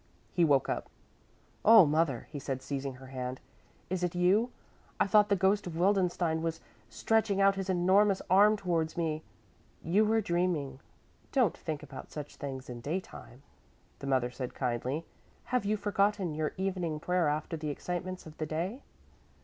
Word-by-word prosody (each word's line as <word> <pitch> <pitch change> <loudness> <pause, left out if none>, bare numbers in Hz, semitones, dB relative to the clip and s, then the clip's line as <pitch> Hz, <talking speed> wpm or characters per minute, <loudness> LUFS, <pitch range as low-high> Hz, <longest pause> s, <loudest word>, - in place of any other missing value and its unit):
He 175 - +3
woke 140 -4 +4
up. - - -3 0.7
"Oh, 220 -4 +9
mother," 150 -4 +1
he 145 - -5
said, 130 -1 -4
seizing 135 -1 -4
her 130 +1 -13
hand, 125 0 -4 0.5
"is 180 0 -2
it 180 0 -1
you? 190 +7 +3 0.5
I - - +4
thought 210 +1 +4
the 200 - +4
ghost 195 +1 +2
of 165 -2 -5
Wildenstein 175 -3 +2
was 165 0 -2 0.3
stretching 205 - +1
out 195 0 +5
his 195 -1 -4
enormous 190 +2 +4
arm 205 +3 +5
towards 170 -5 -1
me! 160 -2 -1 0.6
"You 190 +7 +3
were 220 +1 +3
dreaming; 170 -8 -1 0.5
don't 250 - +2
think 155 -2 -5
about 135 -2 -10
such 150 -1 -7
things 135 -2 -6
in 120 -1 -7
daytime," 145 -4 -6 0.6
the 140 - -6
mother 130 -2 +1
said 125 0 -6
kindly. 130 +5 -2 0.4
"Have 250 -5 -1
you 215 +1 +1
forgotten 200 -3 +1
your 155 0 -2
evening 180 -5 -2
prayer 180 0 +1
after 150 +2 -1
the 155 -1 -4
excitements 180 +4 -4
of 155 -1 -11
the 155 - -2
day?" 180 - -3
170 Hz, 165 wpm, -31 LUFS, 145-195 Hz, 0.7 s, Oh